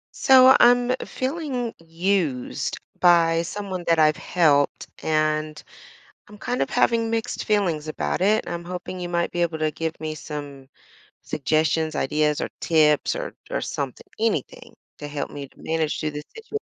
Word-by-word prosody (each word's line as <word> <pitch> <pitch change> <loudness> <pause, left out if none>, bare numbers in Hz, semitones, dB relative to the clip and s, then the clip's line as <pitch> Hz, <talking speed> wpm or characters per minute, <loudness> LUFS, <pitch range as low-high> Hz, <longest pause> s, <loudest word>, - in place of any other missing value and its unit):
So, 260 0 +7
I'm 245 +1 +5 0.2
feeling 260 -4 -3
used 165 -5 -1 0.2
by 165 -2 +5
someone 190 +1 -5
that 165 -1 +4
I've 155 -1 +4
helped, 145 -5 +2 0.2
and 155 0 0 0.7
I'm 210 0 -13
kind 245 +3 -2
of - - -2
having 230 -2 +2
mixed 225 -1 -2
feelings 175 -8 0
about 75 - -2
it. 210 +3 +2
I'm 170 0 -4
hoping 180 +1 -6
you 175 - -4
might 170 0 -1
be 175 - 0
able 165 -2 -1
to 155 -1 0
give 165 +1 -4
me 155 -1 -4
some 145 -3 -8 0.5
suggestions, 155 +2 0
ideas, 150 +2 +1
or - - -2
tips, 155 -3 +3
or - - -5 0.2
or - - -2
something, 135 -3 -4
anything 220 - -2 0.2
to 145 - -7
help 145 -1 -4
me 140 -1 -7
to - - -28
manage 160 -1 -1
through 155 -1 -1
this 150 0 -7
situ 450 -1 -5
165 Hz, 160 wpm, -24 LUFS, 155-205 Hz, 0.7 s, So